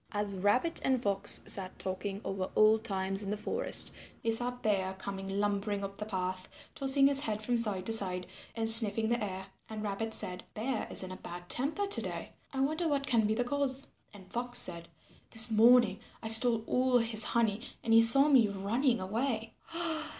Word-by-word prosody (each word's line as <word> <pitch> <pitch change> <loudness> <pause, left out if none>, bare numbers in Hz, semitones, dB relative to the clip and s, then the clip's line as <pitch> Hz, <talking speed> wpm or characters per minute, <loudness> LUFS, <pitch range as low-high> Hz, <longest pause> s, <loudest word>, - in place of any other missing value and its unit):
As 205 -1 -4
Rabbit 225 - 0
and 260 -1 0
Fox 200 -3 -1
sat 190 -2 -6
talking 195 +2 -6
over 190 -1 -5
old 215 +1 +3
times 195 -2 -3
in 200 - -5
the 210 - -4
forest, 210 - +1 0.3
they 230 - -1
saw 240 +2 0
Bear 205 -6 -3
coming 195 0 -8
lumbering 205 0 -3
up 195 0 -8
the 210 - -6
path, 185 -2 -7
tossing 275 0 +2
his 275 0 +5
head 215 -5 -3
from 245 +2 -2
side 200 -5 -2
to 225 - +2
side, 185 -4 +4 0.3
and 225 -1 -3
sniffing 225 -1 +6
the 235 -1 -2
air. 190 -1 -7 0.2
And 215 -1 -7
Rabbit 215 +2 -5
said, 180 -4 0
"Bear 230 +2 -4
is - - -1
in 185 - -8
a 185 - -9
bad 175 0 -11
temper 305 +11 -3
to 400 +1 +1
day. - - -7 0.2
I 265 -2 -4
wonder 310 +5 -2
what 280 -2 -2
can 225 -5 0
be 215 - -1
the 245 - -1
cause." 275 +1 -3 0.3
And 200 -3 -15
Fox 245 +5 -1
said, 170 -6 +4 0.4
"This 225 +1 +4
morning 225 -2 +3 0.2
I 220 - -5
stole 225 0 +6
all 255 +1 0
his 225 -2 +4
honey 225 -2 0 0.2
and 225 - -1
he 225 - +6
saw 275 +5 +7
me 260 -7 +3
running 230 +6 -2
away." 225 +3 -4
220 Hz, 195 wpm, -29 LUFS, 195-245 Hz, 0.4 s, saw